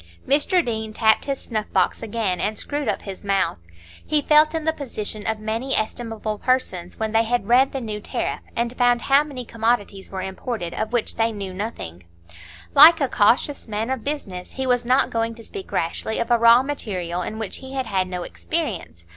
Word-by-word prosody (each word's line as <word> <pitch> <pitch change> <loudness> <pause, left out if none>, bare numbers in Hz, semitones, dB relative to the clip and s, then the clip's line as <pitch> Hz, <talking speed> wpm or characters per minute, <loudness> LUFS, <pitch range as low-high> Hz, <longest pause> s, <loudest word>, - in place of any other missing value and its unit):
Mr 315 +5 +3
Deane 220 -2 -3
tapped 220 0 +3
his 275 -2 -2
snuff 215 -3 -4
box - - +2
again 215 -5 -1
and 215 0 -1
screwed 290 +2 -3
up - - -1
his 195 -1 -8
mouth; 195 - 0 0.4
he 305 0 +2
felt 305 +1 +5
in 320 -1 -2
the 320 - +2
position 215 -7 -5
of 220 -1 0
many 225 +5 -1
estimable 215 -1 -3
persons 185 -9 -1
when 220 -1 -1
they 225 +1 +4
had 230 -3 -1
read 255 +3 +5
the 270 - -3
New 215 -4 -4
Tariff, - - -3 0.2
and 235 +1 -1
found 245 -1 +3
how 275 +2 +5
many 270 -5 -7
commodities 225 -4 -1
were 190 -1 -4
imported 190 -1 -4
of 220 0 -3
which 240 -2 -1
they 225 0 +2
knew 200 -3 -6
nothing; 185 - -6 0.7
like 325 +4 +9
a 275 - +2
cautious 245 +6 +2
man 220 +3 -2
of 265 -3 -2
business, 195 -12 -5
he 265 - -3
was 245 -1 +1
not 260 +2 +3
going 230 0 -1
to 230 - -12
speak 390 - -9
rashly 170 +6 -1
of 230 +1 -2
a 240 - +6
raw 235 +2 +7
material 185 -11 -3
in 215 +4 -4
which 220 -3 -3
he 265 0 -9
had 265 -1 -1
had 190 -4 0
no 180 -1 -4
experience. 85 - -4
225 Hz, 200 wpm, -23 LUFS, 205-260 Hz, 0.7 s, like